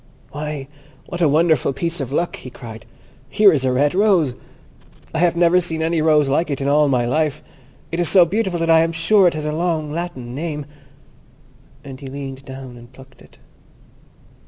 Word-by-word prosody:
"Why, 150 -2 -5 0.4
what 175 - -6
a 160 - +4
wonderful 155 -2 +2
piece 170 +4 -3
of 135 -2 -4
luck!" 170 +4 -1
he 130 - -10
cried; 115 -2 -11 0.4
"here 210 -2 +5
is 140 -4 0
a 130 - +1
red 140 +3 +1
rose! 185 - +3 0.8
I 160 - -1
have 175 0 +2
never 175 +1 +4
seen 160 -2 -3
any 165 0 0
rose 155 -2 +3
like 150 +4 0
it 140 - -2
in 135 - -2
all 150 +1 +3
my 125 -3 +1
life. 150 +3 -1 0.5
It 165 - -3
is 175 - +3
so 185 -3 +6
beautiful 190 -1 -1
that 165 - 0
I 165 - +6
am 165 +1 +1
sure 185 +4 +4
it 170 - 0
has 155 -1 -4
a 150 - -1
long 160 -2 -1
Latin 150 -8 -5
name"; 150 0 -4 1.2
and 135 -2 -10
he 140 - -9
leaned 135 0 -7
down 130 -2 -9
and 120 +1 -15
plucked 130 0 -17
it. - - -19
150 Hz, 195 wpm, -20 LUFS, 135-170 Hz, 1.2 s, so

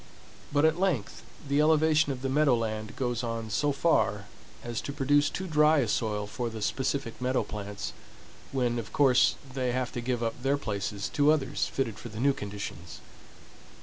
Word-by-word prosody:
But 145 +1 +3
at 160 +2 +2
length 175 - -1 0.3
the 140 +2 +3
elevation 155 -1 +4
of 130 -1 -6
the - - 0
meadow 140 -1 +3
land 110 -1 -3
goes 120 -2 -1
on 115 -2 -3
so 145 +8 +1
far 105 -10 +1 0.4
as 120 -2 -3
to - - -5
produce 145 +1 +2
too 190 - -4
dry 155 -2 +4
a 130 -5 +2
soil 105 -1 -1
for 120 +3 -4
the 110 -2 -6
specific 130 0 -2
meadow 130 +1 +1
plants, 105 -1 -6 0.6
when, 120 -3 0
of 110 - -7
course, 135 -3 +4 0.2
they 125 -2 -1
have 130 -1 -1
to 120 - -4
give 120 -1 -1
up 115 +2 -3
their 135 +2 +2
places 100 -4 -3
to 145 +1 +4
others 155 -2 0
fitted 115 -6 -2
for 120 - -8
the 105 0 -8
new 140 +3 +3
conditions. 100 -6 -7
125 Hz, 180 wpm, -28 LUFS, 110-145 Hz, 0.6 s, elevation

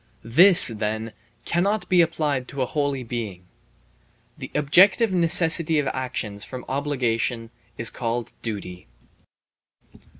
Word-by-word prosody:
This, 170 +11 +6
then, 110 0 -4 0.3
cannot 185 +2 -1
be 180 -1 +4
applied 150 -6 -1
to 140 -2 -3
a - - -1
holy 140 -1 -2
being. 110 -7 -6 0.9
The - - -9
objective 190 - +4
necessity 165 -2 +3
of 145 - 0
actions 120 -6 -4
from 130 -2 -7
obligation 125 -4 -2 0.3
is 115 - -1
called 120 -1 -4
duty. 95 - -7
130 Hz, 110 wpm, -23 LUFS, 115-165 Hz, 0.9 s, This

